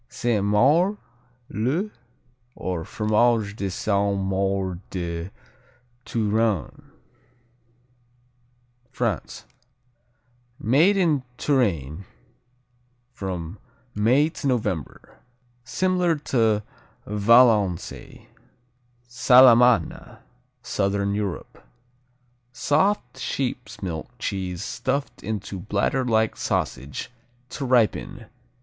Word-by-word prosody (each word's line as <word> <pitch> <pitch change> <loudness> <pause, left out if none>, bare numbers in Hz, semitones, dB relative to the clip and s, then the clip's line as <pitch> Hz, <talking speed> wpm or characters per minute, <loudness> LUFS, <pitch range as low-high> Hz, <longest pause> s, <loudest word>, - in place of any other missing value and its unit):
Sainte 120 -4 -1
Maure, 150 - +3 0.5
le, 150 - -1 0.6
or 90 -3 -3
Fromage 110 +1 +1
de 100 -3 -3
Sainte 100 +1 0
Maure 95 -1 -1
de 85 -1 -4 0.8
Touraine 110 -5 -1 2.0
France 115 - -3 1.1
Made 155 - +3
in 160 -7 +2 0.2
Touraine 95 - 0 1.1
from 95 -4 -5 0.3
May 120 +8 +3
to 155 -3 -5
November. 110 - -3 0.4
Similar 180 +2 +1
to 115 -7 +1 0.4
Valençay. 105 -3 +2 0.8
Salamana 125 0 +5 0.5
Southern 100 -2 -1
Europe 100 -3 -5 0.9
Soft 145 -2 0
sheep's 120 -5 -4
milk 80 -1 -4
cheese 95 -5 -4
stuffed 130 +3 -3
into 105 -2 -5
bladderlike 110 +3 0
sausage, 70 - -3 0.4
to 140 - -5
ripen. 120 -1 +1
110 Hz, 70 wpm, -24 LUFS, 100-130 Hz, 2.0 s, Salamana